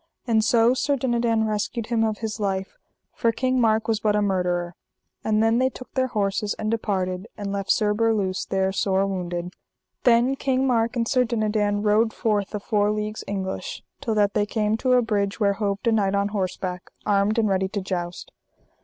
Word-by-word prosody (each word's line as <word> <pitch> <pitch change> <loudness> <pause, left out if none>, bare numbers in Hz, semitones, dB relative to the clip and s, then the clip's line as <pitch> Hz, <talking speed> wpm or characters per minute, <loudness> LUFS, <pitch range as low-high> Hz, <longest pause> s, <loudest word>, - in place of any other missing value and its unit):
And 225 -3 +2
so 235 0 +4
Sir 285 +2 +1
Dinadan 235 -3 +1
rescued 215 +1 -2
him 225 -1 +3
of 220 -1 0
his 215 0 -4
life, 195 -2 -2 0.4
for 230 - +1
King 255 +1 0
Mark 220 -1 +2
was 225 -2 +1
but 210 -1 +1
a 210 - +2
murderer. 180 -3 0 0.5
And 215 0 +2
then 225 +1 +3
they 260 0 +3
took 255 -1 -12
their 260 -1 +1
horses 205 -2 -1
and 215 0 -2
departed 190 -3 -2
and 200 -2 -4
left 195 -1 -3
Sir 210 -2 +2
Berluse 210 -4 0
there 190 0 +1
sore 195 0 +1
wounded. 180 -2 -4 0.5
Then 245 +2 +4
King 265 -1 0
Mark 235 -2 +1
and 230 -1 0
Sir 255 +1 +3
Dinadan 215 -3 0
rode 215 +2 +3
forth 210 -2 -1
a - - -2
four 205 0 +1
leagues 215 0 -3
English, 195 - -4 0.2
till 230 -6 -1
that 205 -1 +2
they 210 -1 +1
came 215 0 0
to 255 +2 +1
a 250 -1 +4
bridge 205 -2 -1
where 200 -2 +3
hoved 200 -1 -2
a 230 - +4
knight 200 -3 +2
on 200 0 +1
horseback, 185 -2 -3 0.2
armed 205 +2 +2
and 225 -2 +3
ready 190 -1 +1
to 200 +2 -3
joust. 180 -2 -4
210 Hz, 195 wpm, -24 LUFS, 195-230 Hz, 0.5 s, so